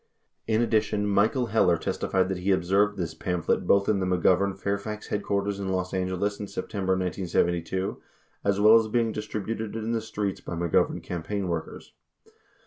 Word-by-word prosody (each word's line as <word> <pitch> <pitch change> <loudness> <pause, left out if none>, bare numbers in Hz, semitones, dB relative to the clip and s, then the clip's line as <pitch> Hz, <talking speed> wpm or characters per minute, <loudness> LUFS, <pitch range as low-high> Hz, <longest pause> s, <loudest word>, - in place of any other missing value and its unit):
38 110 - +1
In 110 - +3
addition, 105 -2 +1
Michael 105 +5 +2
Heller 105 -6 +3
testified 95 +3 0
that 95 -1 -2
he 95 +2 -2
observed 100 +3 +2
this 85 -4 -3
pamphlet 90 -3 -1
both 100 0 +4
in 105 -2 +2
the 95 - 0
McGovern 95 +2 +2
Fairfax 100 +1 -3
headquarters 100 -1 -1
in 95 -1 -3
Los 95 -1 -2
Angeles 95 +2 -1
in 105 - -5
Septem 100 -1 -4
ber 95 - +4
1972, 90 0 -1 0.4
as 100 0 +1
well 105 +2 +7
as 110 - -2
being 115 0 +1
distributed 110 +1 -4
in 110 0 -2
the 115 -1 0
streets 105 -3 -3
by - - -6
McGovern 85 -1 +1
cam 90 -2 -4
paign 100 +3 -3
workers. 85 -2 -5
100 Hz, 175 wpm, -26 LUFS, 95-105 Hz, 0.4 s, well